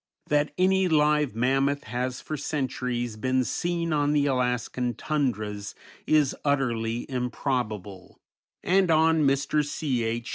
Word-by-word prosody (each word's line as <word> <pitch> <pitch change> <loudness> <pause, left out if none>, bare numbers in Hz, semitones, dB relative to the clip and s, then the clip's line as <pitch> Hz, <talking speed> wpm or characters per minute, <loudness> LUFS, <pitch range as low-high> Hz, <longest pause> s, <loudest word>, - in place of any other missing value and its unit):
That 150 0 +2
any 190 +1 +3
live 150 -5 +2
mammoth 135 +4 +1
has 125 +1 -3
for 155 - -5
centuries 125 -5 -3
been 130 +3 +1
seen 170 +4 -1
on 145 0 +2
the 145 -1 +2
Alaskan 125 -2 -1
tundras 110 -9 -2 0.3
is 150 -3 +3
utterly 120 -5 0
improbable, 120 -7 -3 0.4
and 185 0 +3
on 160 0 +4
Mr. 140 +2 +1
C. 140 -4 -2
H. 115 +1 -3
135 Hz, 120 wpm, -26 LUFS, 120-150 Hz, 0.4 s, on